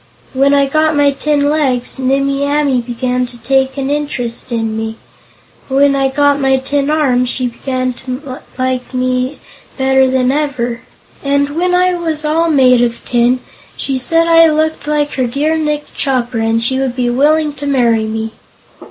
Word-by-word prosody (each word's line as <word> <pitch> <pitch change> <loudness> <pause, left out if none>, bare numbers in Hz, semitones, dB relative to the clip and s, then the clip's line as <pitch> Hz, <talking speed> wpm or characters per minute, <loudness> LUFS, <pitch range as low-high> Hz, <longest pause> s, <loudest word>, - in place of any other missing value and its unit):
When 275 +1 +3
I 280 -1 +4
got 310 +2 +1
my 290 -1 +3
tin 285 +1 0
legs, 270 -4 0
Nimmie 275 +1 0
Amee 285 -3 +1
began 250 +1 -2
to 245 0 -10
take 265 +3 0
an 275 0 -2
interest 260 -5 -3
in 225 -2 -2
me; 220 0 -4 0.7
when 275 +1 +3
I 270 -1 +2
got 285 +1 +2
my 265 -1 +2
tin 275 +2 -1
arms, 255 -5 +1
she 255 0 -2
began 255 +1 -3
to 260 +1 -6 0.2
like 255 0 -2
me 255 +2 -1 0.4
better 265 -1 +3
than 255 0 +1
ever, 255 -5 -2 0.4
and 280 0 +1
when 360 +4 0
I 365 0 +3
was 320 -3 -3
all 325 +2 +1
made 255 -5 +4
of 235 -1 -2
tin, 245 +1 +1 0.4
she 270 -2 -1
said 330 +6 +2
I 330 0 +6
looked 315 0 -1
like 295 -1 0
her 255 -2 -1
dear 290 +6 0
Nick 300 -2 -1
Chopper 250 -4 -1
and 225 +1 0
she 260 +3 +1
would 265 -2 -2
be 245 -1 0
willing 300 +4 +2
to 285 0 -6
marry 235 -5 +2
me. 220 0 -4
270 Hz, 170 wpm, -14 LUFS, 250-290 Hz, 0.7 s, I